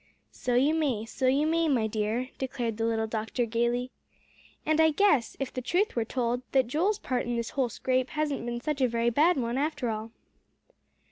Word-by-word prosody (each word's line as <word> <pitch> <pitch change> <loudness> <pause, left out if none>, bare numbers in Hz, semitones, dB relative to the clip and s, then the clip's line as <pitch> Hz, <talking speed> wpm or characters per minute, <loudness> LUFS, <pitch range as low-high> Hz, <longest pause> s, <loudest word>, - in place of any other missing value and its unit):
"So 245 -1 -2
you 275 +5 +4
may; 275 -9 0
so 255 +3 -2
you 275 +4 +3
may, 330 +1 +2
my 250 -7 +2
dear," 220 +4 -1
declared 245 -4 -3
the 225 - 0
little 225 -1 0
doctor 220 +2 -2
gaily. 240 +2 0 0.7
"And 310 +1 +3
I 320 - +6
guess, 310 - +2
if 270 -2 -3
the 255 - -3
truth 365 - 0
were 230 -2 0
told, 245 0 -1
that 265 -2 +4
Joel's 345 - +1
part 250 - -2
in 240 - -1
this 235 -1 -3
whole 260 -3 0
scrape 255 +3 0
hasn't 300 -4 -2
been 240 0 -4
such 295 0 -2
a 255 - +5
very 235 0 +1
bad 315 +8 +4
one 240 0 -1
after 290 -5 -1
all." 220 +1 -5
250 Hz, 200 wpm, -28 LUFS, 235-295 Hz, 0.7 s, I